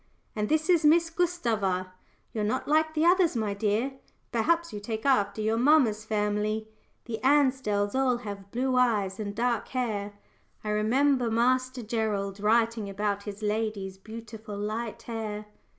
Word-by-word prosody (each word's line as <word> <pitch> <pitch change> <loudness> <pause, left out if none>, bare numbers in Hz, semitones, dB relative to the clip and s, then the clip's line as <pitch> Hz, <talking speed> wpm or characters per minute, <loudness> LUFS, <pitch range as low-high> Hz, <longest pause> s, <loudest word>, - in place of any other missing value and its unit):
"And 210 -1 -1
this 315 0 +1
is 345 -4 +4
Miss 330 +2 +4
Gustava 220 - 0 0.4
you're 215 - -1
not 215 +5 -1
like 315 +1 +2
the 310 +1 +2
others, 355 -3 +4
my 215 -3 -1
dear. 220 +6 -1 0.3
Perhaps 335 +9 +1
you 210 - -4
take 220 +3 -5
after 215 -6 +2
your 220 +1 +1
mamma's 245 -6 +4
family 215 0 -1 0.4
the 225 -2 -4
Ansdells 260 -8 +2 0.3
have 205 -3 -5
all 195 - -16
blue 255 +2 0
eyes 210 -6 +2
and 205 -1 -4
dark 240 0 0
hair. 215 -5 -2 0.5
I 215 - -3
remember 245 +4 +2
Master 255 +2 +1
Gerald 210 -3 -2
writing 225 0 +2
about 200 0 -2
his 205 0 -7
lady's 210 -3 -2
beautiful 220 -1 -9
light 215 +2 -4
hair." 215 -2 -5
220 Hz, 150 wpm, -28 LUFS, 210-255 Hz, 0.5 s, is